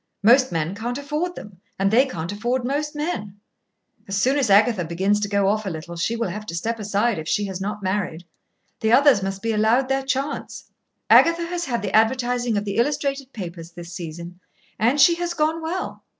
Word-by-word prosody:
Most 255 +4 +5
men 165 +1 -1
can't 235 +4 -4
afford 300 +5 -3
them, 195 -4 -11 0.2
and 195 +1 +1
they 255 +5 +4
can't 170 -7 -5
afford 240 +5 -2
most 295 +3 -2
men. 210 - -4 0.7
As 195 0 -1
soon 260 +7 +2
as 255 -6 +1
Agatha 205 -1 +4
begins 190 +5 0
to 210 - -1
go 200 -1 +2
off 215 +2 +1
a 195 - -3
little, 165 0 -7
she 180 +7 -1
will 230 -4 -2
have 210 +4 -7
to 170 - -5
step 225 +7 -2
aside, 205 0 0
if 155 - -7
she 205 +3 0
has 190 -1 -5
not 205 +1 -4
married. 185 -3 -2 0.5
The 220 - +1
others 275 -5 +6
must 195 +1 -4
be 225 - 0
allowed 225 +5 +2
their 270 0 +1
chance. 270 +2 -4 0.4
Agatha 335 +1 +5
has 345 0 -3
had 235 -5 -2
the - - -1
advertising 240 0 +2
of 205 - -2
the 200 - -3
illustrated 275 +1 -1
papers 170 -6 -8
this 175 -1 -9
season, 170 0 -8 0.4
and 245 +7 +2
she 340 - +7
has 345 0 -3
gone 315 +1 0
well. 340 +4 -4
220 Hz, 205 wpm, -23 LUFS, 195-270 Hz, 0.7 s, she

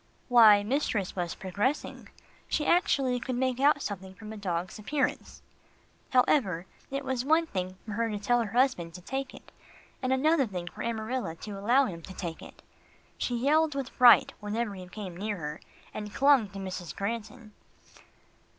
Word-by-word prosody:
Why, 220 -4 +7
mistress 220 -5 -1
was 175 -2 -3
progressing. 205 +10 -2 0.4
She 300 - -1
actually 270 -8 +2
could 255 +1 -3
make 255 0 0
out 285 +1 +4
something 190 -2 -6
from 215 +3 -9
a - - -8
dog's 185 -1 -3
appearance. 265 +5 -2 0.7
However, 225 - +2 0.2
it 275 0 -4
was 260 -2 -1
one 320 +4 +3
thing 185 - -4
for 220 - -7
her 230 +2 -1
to 210 - -3
tell 240 +4 +2
her 215 -2 -4
husband 180 -11 +1
to 180 - -9
take 265 +7 -4
it, - - -15 0.5
and 255 0 -1
another 275 +1 +3
thing 180 -4 -5
for - - -8
Amarilla 230 -4 -3
to 210 - -7
allow 235 +8 +3
him 170 -7 -6
to 190 +3 -10
take 170 -3 -5
it. - - -13 0.6
She 245 - -1
yelled 300 +4 +2
with 275 -2 -3
fright, 245 -2 +6
whenever 210 +1 -2
he 185 -2 -9
came 185 -2 -7
near 205 +3 -3
her, 150 -2 -6 0.3
and 210 -1 -6
clung 275 -4 +4
to 195 - -10
Mrs. 185 -3 -6
Granton. 225 +2 -5
220 Hz, 170 wpm, -29 LUFS, 190-260 Hz, 0.7 s, Why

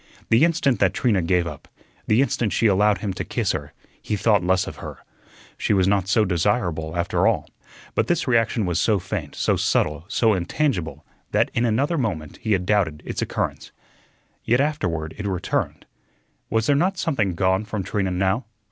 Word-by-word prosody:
The 115 +6 +5
instant 165 -6 +2
that - - +2
Trina 110 -7 +2
gave 90 +1 +1
up, 85 - -8 0.4
the 115 +5 +4
instant 120 -4 -1
she 115 - +1
allowed 105 0 +4
him 100 -3 -2
to - - -4
kiss - - -1
her, - - -5 0.3
he 105 - -2
thought 105 -2 +2
less 90 0 +2
of - - -8
her. - - -8 0.6
She - - +1
was 95 -2 +3
not 100 -2 +1
so 105 +2 +3
desirable, 85 -3 0
after 85 0 +1
all. - - +1 0.5
But - - +1
this 175 -3 0
reaction 115 -3 +2
was 90 -1 0
so 110 +2 +3
faint, 90 -5 -5
so - - +1
subtle, 75 +1 0
so 110 +1 +2
intangible, 90 - -1 0.3
that - - +2
in 115 - +1
another 140 +9 +1
moment 85 - -3
he 110 -2 -1
had 90 -2 0
doubted 90 -7 +1
its - - -4
occurrence. - - -3 0.7
Yet 120 +2 +2
afterward 90 - -1
it 100 - -3
returned. 90 -2 -2 0.6
Was 110 -1 +1
there 145 - +3
not 185 +6 +1
something 105 - 0
gone 95 +3 +1
from 105 -2 -4
Trina 100 0 -1
now? 95 +6 0
100 Hz, 185 wpm, -23 LUFS, 90-115 Hz, 0.7 s, The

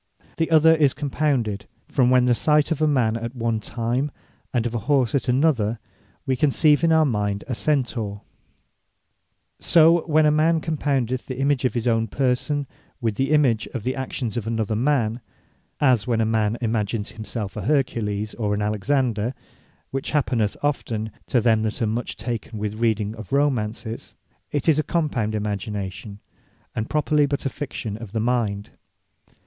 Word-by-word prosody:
The 165 - 0
other 160 0 +6
is 150 -4 +3
Compounded; 130 -8 -1 0.2
as - - -25
when 125 -3 +4
from 125 -1 +5
the 125 - +4
sight 150 +5 +2
of 155 -1 -1
a 155 - +4
man 125 -7 +2
at 115 +2 -5
one 115 -2 -1
time, 120 +6 -2 0.4
and 120 -2 0
of 120 - -2
a 120 - -1
horse 130 -6 +3
at 140 - 0
another, 125 -5 +2 0.5
we 130 - +1
conceive 150 +3 +3
in 165 - +4
our 160 -1 +5
mind 105 -5 -1
a 130 - -2
Centaure. 115 -7 -1 1.4
So 165 0 +5
when 155 -1 +4
a 150 - +5
man 160 +2 +3
compoundeth 140 -6 -1
the 130 - -5
image 140 -1 +1
of 125 - 0
his 120 0 -1
own 115 -1 +2
person, 135 +4 0 0.3
with 115 -4 0
the 135 +5 -1
image 135 -8 +3
of 115 - -3
the 130 +2 -1
actions 125 -4 -4
of 115 -2 -3
an 115 0 -1
other 110 0 0
man; 120 -2 +1 0.6
as 130 -6 +3
when 115 -2 +1
a 110 - +2
man 110 0 +1
imagins 110 -1 -1
himselfe 110 -3 -6
a - - -4
Hercules, 110 -7 0
or 105 -3 -1
an 105 - -2
Alexander, 115 +2 0 0.6
(which 135 0 -3
happeneth 120 -8 0
often 110 -7 -1 0.2
to 125 - +2
them 110 -1 +3
that 110 -1 -2
are 115 - +1
much 115 +3 -3
taken 115 -2 -4
with 105 0 -3
reading 110 -2 +1
of 110 - -9
Romants) 130 -6 0 0.7
it 145 +1 -2
is 155 -2 +4
a - - +2
compound 130 -12 -1
imagination, 100 -1 -4 0.5
and 110 - -3
properly 150 -1 +2
but 140 0 -3
a - - +1
Fiction 120 -7 -5
of 110 -3 -10
the 115 - 0
mind. 110 -4 -1
120 Hz, 175 wpm, -23 LUFS, 110-145 Hz, 1.4 s, other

